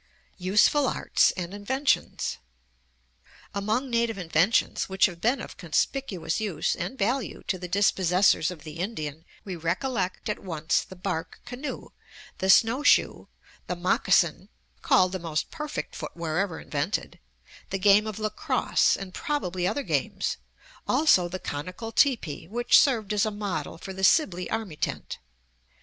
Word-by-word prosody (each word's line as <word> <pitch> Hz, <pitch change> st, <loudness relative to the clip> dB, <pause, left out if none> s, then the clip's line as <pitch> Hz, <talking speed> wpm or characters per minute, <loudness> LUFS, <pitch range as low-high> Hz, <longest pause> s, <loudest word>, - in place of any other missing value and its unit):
USEFUL 210 Hz, +10 st, +3 dB
ARTS -, -, +2 dB
AND 180 Hz, +1 st, -4 dB
INVENTIONS 265 Hz, -, -1 dB, 1.1 s
Among 215 Hz, +6 st, -1 dB
native 235 Hz, -2 st, +1 dB
inventions 180 Hz, +5 st, +1 dB
which 190 Hz, 0 st, +4 dB
have 175 Hz, -3 st, -3 dB
been 245 Hz, +4 st, +2 dB
of -, -, -8 dB
conspicuous 175 Hz, -, -1 dB
use 205 Hz, -6 st, -1 dB
and 265 Hz, -, -5 dB
value 240 Hz, +4 st, -1 dB
to 185 Hz, -, -2 dB
the 180 Hz, -, -6 dB
dispossessors 185 Hz, -2 st, +3 dB
of 175 Hz, -5 st, -9 dB
the 155 Hz, 0 st, -9 dB
Indian 160 Hz, -6 st, -4 dB, 0.2 s
we 190 Hz, -3 st, -5 dB
recollect 185 Hz, +4 st, -2 dB
at 210 Hz, -, -2 dB
once 165 Hz, -2 st, 0 dB
the 185 Hz, -, -11 dB
bark 180 Hz, -3 st, -4 dB
canoe, 250 Hz, +4 st, -6 dB, 0.5 s
the 190 Hz, -, -1 dB
snowshoe, 230 Hz, +8 st, +4 dB, 0.4 s
the 180 Hz, -, -2 dB
moccasin 175 Hz, +1 st, +2 dB, 0.3 s
(called 185 Hz, -1 st, +4 dB
the 190 Hz, -, -3 dB
most 165 Hz, -3 st, -3 dB
perfect 300 Hz, -2 st, -5 dB
footwear 165 Hz, 0 st, -3 dB
ever 190 Hz, -5 st, -1 dB
invented), 150 Hz, +7 st, -3 dB, 0.5 s
the 195 Hz, -, -1 dB
game 205 Hz, +2 st, +5 dB
of 215 Hz, -, -5 dB
lacrosse 215 Hz, -1 st, +1 dB
and 190 Hz, -2 st, -8 dB
probably 185 Hz, -, -2 dB
other 285 Hz, +8 st, -1 dB
games, -, -, -1 dB, 0.5 s
also 190 Hz, -, +4 dB
the 185 Hz, -, -4 dB
conical 185 Hz, +8 st, -6 dB
teepee 220 Hz, -, +1 dB
which 240 Hz, +5 st, +4 dB
served 225 Hz, -8 st, +2 dB
as 210 Hz, +1 st, +2 dB
a -, -, +1 dB
model 205 Hz, -7 st, -4 dB
for 190 Hz, +3 st, -8 dB
the 190 Hz, 0 st, -7 dB
Sibley 190 Hz, -, +3 dB
army 215 Hz, -9 st, -3 dB
tent. -, -, -4 dB
190 Hz, 140 wpm, -26 LUFS, 175-225 Hz, 1.1 s, game